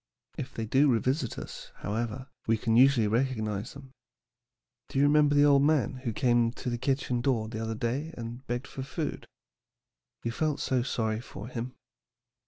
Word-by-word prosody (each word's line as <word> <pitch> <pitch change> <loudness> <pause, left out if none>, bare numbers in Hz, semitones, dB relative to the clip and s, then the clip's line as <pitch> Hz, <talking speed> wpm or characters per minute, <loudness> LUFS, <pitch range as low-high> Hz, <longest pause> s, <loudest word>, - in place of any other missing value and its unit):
If 130 - -5
they 115 - -2
do 135 +5 +4
revisit 125 +2 0
us, - - -8
however, 115 +4 -3 0.2
we 115 0 +3
can 115 +1 +1
usually 125 -3 +6
recognize 110 -2 -1
them. 135 -2 -12 1.0
Do - - -4
you 140 - +5
remember 145 0 +4
the 145 0 +6
old 140 -1 +6
man 145 -2 +2
who 130 -2 -3
came 120 0 +3
to 125 - -4
the 120 - -2
kitchen 130 -2 0
door 120 -4 +1
the 110 0 -5
other 115 0 -2
day 130 +8 -2
and 120 +2 -6
begged 120 +2 -2
for 135 - -7
food? 150 +4 -4 1.0
You 115 - -1
felt 150 +4 -1
so 130 -2 +1
sorry 110 -3 -1
for 110 -1 -9
him. 125 +1 -5
125 Hz, 175 wpm, -29 LUFS, 115-135 Hz, 1.0 s, usually